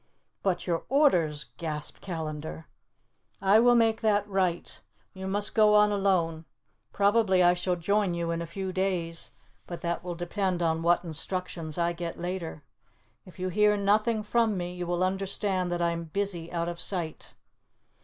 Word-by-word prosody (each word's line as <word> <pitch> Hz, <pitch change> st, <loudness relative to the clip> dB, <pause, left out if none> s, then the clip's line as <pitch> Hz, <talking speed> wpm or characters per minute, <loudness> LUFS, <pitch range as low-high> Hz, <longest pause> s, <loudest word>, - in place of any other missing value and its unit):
"But 180 Hz, -3 st, -1 dB
your 170 Hz, -2 st, -1 dB
orders?" 175 Hz, -, +2 dB
gasped 150 Hz, -3 st, -4 dB
Callandar. 160 Hz, -3 st, -5 dB, 0.7 s
"I 195 Hz, +3 st, +5 dB
will 240 Hz, +1 st, +5 dB
make 225 Hz, -1 st, +3 dB
that 205 Hz, -2 st, +2 dB
right. 185 Hz, -4 st, -1 dB, 0.3 s
You 190 Hz, 0 st, -6 dB
must 205 Hz, +2 st, +1 dB
go 215 Hz, -1 st, +5 dB
on 210 Hz, 0 st, +5 dB
alone. 175 Hz, -5 st, +1 dB, 0.5 s
Probably 200 Hz, -2 st, +3 dB
I 175 Hz, 0 st, +6 dB
shall 180 Hz, 0 st, -1 dB
join 195 Hz, +1 st, +1 dB
you 170 Hz, -1 st, -2 dB
in 170 Hz, 0 st, -2 dB
a 170 Hz, -, -5 dB
few 190 Hz, +2 st, -5 dB
days, 180 Hz, -3 st, -1 dB, 0.4 s
but 170 Hz, -2 st, -7 dB
that 170 Hz, 0 st, -2 dB
will 175 Hz, -1 st, -4 dB
depend 175 Hz, +1 st, -1 dB
on 160 Hz, -1 st, +1 dB
what 170 Hz, +1 st, +3 dB
instructions 165 Hz, -1 st, -3 dB
I 170 Hz, 0 st, +1 dB
get 170 Hz, -1 st, -5 dB
later. 175 Hz, -4 st, -5 dB, 0.6 s
If 180 Hz, -, -14 dB
you 185 Hz, 0 st, -2 dB
hear 210 Hz, +2 st, +3 dB
nothing 215 Hz, +2 st, +2 dB
from 220 Hz, -1 st, +1 dB
me 175 Hz, 0 st, -4 dB
you 180 Hz, -1 st, -5 dB
will 175 Hz, +1 st, 0 dB
understand 190 Hz, 0 st, 0 dB
that 175 Hz, 0 st, -1 dB
I 170 Hz, -, +2 dB
am 170 Hz, 0 st, -4 dB
busy 175 Hz, -1 st, -3 dB
out 170 Hz, -1 st, -2 dB
of 175 Hz, 0 st, -3 dB
sight. 170 Hz, -5 st, -4 dB
180 Hz, 165 wpm, -28 LUFS, 170-200 Hz, 0.7 s, I